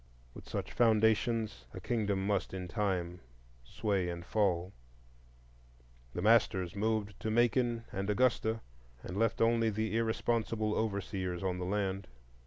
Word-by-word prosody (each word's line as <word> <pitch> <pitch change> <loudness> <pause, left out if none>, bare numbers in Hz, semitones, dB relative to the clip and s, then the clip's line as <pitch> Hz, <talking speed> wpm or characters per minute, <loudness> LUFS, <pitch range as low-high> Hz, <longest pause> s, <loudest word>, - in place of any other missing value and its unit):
With - - -12
such - - -4
foundations 110 - +2
a - - -5
kingdom 105 -5 -1
must 100 -1 0
in 90 -1 -4
time 90 -3 -1 0.4
sway 95 - -1
and 85 0 -5
fall. 95 -3 +1 1.4
The 90 - -2
masters 100 -5 +3
moved 110 0 -1
to 110 - -2
Macon 120 +1 +2
and 95 +1 -3
Augusta, 115 0 +2 0.4
and 90 - -6
left 115 +2 +1
only 115 0 +3
the 110 0 -2
irresponsible 115 -1 0
overseers 100 -4 -2
on 90 -1 -1
the 90 - -2
land. 95 0 -1
105 Hz, 130 wpm, -33 LUFS, 95-115 Hz, 1.4 s, masters